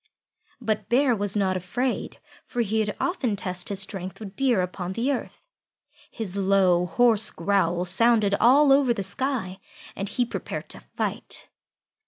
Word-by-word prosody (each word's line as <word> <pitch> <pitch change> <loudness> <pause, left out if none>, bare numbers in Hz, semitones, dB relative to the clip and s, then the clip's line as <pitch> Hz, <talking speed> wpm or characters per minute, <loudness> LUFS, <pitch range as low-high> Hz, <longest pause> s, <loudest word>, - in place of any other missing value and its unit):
But 220 -3 -2
Bear 250 0 +3
was 205 -1 -1
not 190 -2 +1
afraid, 240 +8 -2 0.2
for 245 - -3
he 220 0 0
had 210 -1 -1
often 265 - 0
tested 185 -3 -3
his 200 -1 -1
strength 190 -1 -4
with 200 -3 -9
Deer 250 -8 +2
upon 180 0 -4
the 240 +7 0
earth. 270 - -4 0.7
His 205 -5 -6
low, 190 -2 +3
hoarse 220 +3 +3
growls 175 -1 0
sounded 215 0 +3
all 275 +4 +6
over 270 -4 +3
the 200 - -3
sky, 200 -3 -3 0.4
and 195 0 -4
he 245 +3 0
prepared - - -6
to - - -8
fight. - - -5
205 Hz, 155 wpm, -25 LUFS, 190-245 Hz, 0.7 s, all